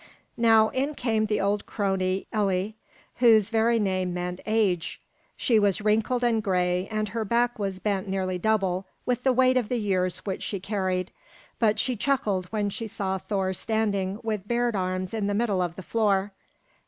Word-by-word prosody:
Now 225 -2 +5
in 275 +3 -1
came 220 -4 0
the 210 0 0
old 200 +1 0
crone, 190 -2 -1
Elli, 200 0 0 0.4
whose 225 -3 +5
very 230 +1 +3
name 185 -4 0
meant 180 0 -3
"age." 205 -6 +1 0.4
She 230 -5 +3
was 205 -1 +2
wrinkled 220 +4 +1
and 230 -2 +2
gray, 180 -1 0
and 215 -1 -2
her 225 +2 -2
back 235 +2 +1
was 195 -2 -2
bent 200 0 -1
nearly 185 -1 -2
double 190 -2 0 0.2
with 250 -1 0
the 260 - +3
weight 255 0 +4
of 240 -4 0
the 250 - 0
years 185 -4 0
which 190 -2 -3
she 200 - -3
carried, 185 -2 -2 0.5
but 215 -2 +3
she 250 +3 0
chuckled 210 -7 0
when 205 0 -1
she 225 +3 -5
saw 190 -2 -3
Thor 190 -1 -1
standing 200 -1 -1
with 210 -3 -3
bared 240 0 +1
arm 185 -1 -1
in 215 -3 -1
the 205 - 0
middle 205 -4 +1
of 175 -2 -2
the 190 - -8
floor. 205 -1 +1
205 Hz, 180 wpm, -26 LUFS, 190-225 Hz, 0.5 s, Now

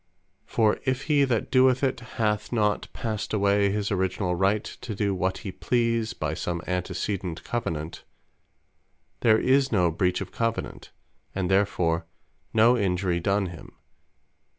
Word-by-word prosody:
For 110 -2 +2
if 130 +1 -1
he 145 -2 +3
that 120 -5 -1
doeth 130 0 +4
it, 130 -2 +1 0.2
hath 105 -2 0
not 105 -3 +1
passed 110 -1 -3
away 100 0 +3
his 105 0 -1
originall 95 -1 0
right 95 +4 +1
to 110 - -7
do 100 0 0
what 95 0 -1
he 95 - -3
please, 115 +1 0
by 75 0 -3
some 85 +1 -3
Antecedent 90 -1 -3
Covenant, 80 -9 -4 1.2
there 110 -2 +5
is 135 +3 +3
no 90 -6 +3
breach 90 +2 0
of 95 - -6
Covenant; 115 -1 -3 0.5
and 95 -1 -1
therefore 85 -4 +1 0.4
no 115 +3 +5
Injury 90 -4 0
done 100 +3 +1
him. 85 -2 -10
100 Hz, 140 wpm, -26 LUFS, 90-115 Hz, 1.2 s, there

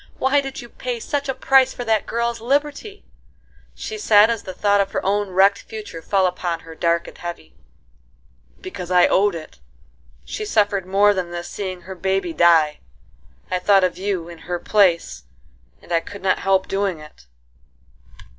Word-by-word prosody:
Why 270 +2 +2
did 270 -1 -7
you - - -10
pay 245 -1 -5
such 280 +3 -3
a 265 - -1
price 265 -1 +3
for 245 - -5
that 220 -2 0
girl's 235 0 -2
liberty?" 290 - -2 0.7
she 435 0 -6
said, 215 - +5
as 230 - -2
the 185 - -8
thought 205 -1 +3
of 195 0 -3
her - - -2
own 205 +1 0
wrecked 195 +3 +4
future 210 -7 -8
fell 190 +3 +1
upon 175 -2 -2
her 165 - -11
dark 170 +1 0
and - - -11
heavy. 175 0 -8 1.1
"Because 195 - -7
I 180 -1 +5
owed 200 -1 +2
it;—she 165 - -11
suffered 205 - +1
more 200 +2 +4
than 185 -3 -3
this 175 0 -6
seeing 185 -3 -5
her 190 +2 -8
baby 190 -2 -1
die;—I 160 - 0
thought 195 +1 +4
of 180 -1 0
you 190 -4 -2
in 170 -1 -11
her 175 - 0
place, 170 - +1 0.6
and - - -15
I 165 - +4
could 200 +3 -11
not 190 - +2
help 190 -1 +1
doing 195 -4 -1
it." 150 - -15
195 Hz, 170 wpm, -21 LUFS, 175-220 Hz, 1.1 s, said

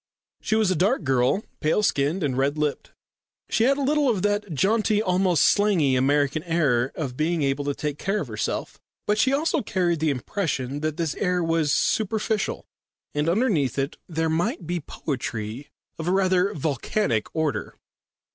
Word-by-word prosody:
She 220 - 0
was 215 -4 +2
a - - +1
dark 195 - +1
girl, 130 - +2 0.2
pale 160 +7 +1
skinned 155 +1 +1
and 135 -4 0
red 140 +3 0
lipped. 150 -1 -2 0.6
She 225 - +3
had 275 +2 +3
a 285 - -1
little 290 0 +2
of 205 -6 0
that 205 -2 0
jaunty, 210 +7 +2
almost 185 -5 +2
slangy 185 -10 +3
American 140 +3 +2
air 145 -7 +1
of 135 -6 -4
being 160 +2 0
able 140 +1 0
to 145 -1 -1
take 150 -1 -4
care 195 +2 -1
of 150 - -4
herself. 110 -2 -4 0.3
But 210 +1 +1
she 260 - +3
also 305 +2 +1
carried 175 -5 0
the 160 0 +1
impression 140 - -2
that 155 0 -2
this 165 -4 -1
air 180 -2 0
was 165 -3 +1
superficial, 220 +2 0 0.5
and 150 +2 0
underneath 170 - +1
it 135 +1 -1
there 160 -1 0
might 175 - -1
be 175 +2 -2
poetry 125 -4 -5 0.3
of 160 - -4
a - - +2
rather 185 0 +2
volcanic 140 - -1
order. 160 -2 -2
165 Hz, 170 wpm, -24 LUFS, 145-205 Hz, 0.6 s, She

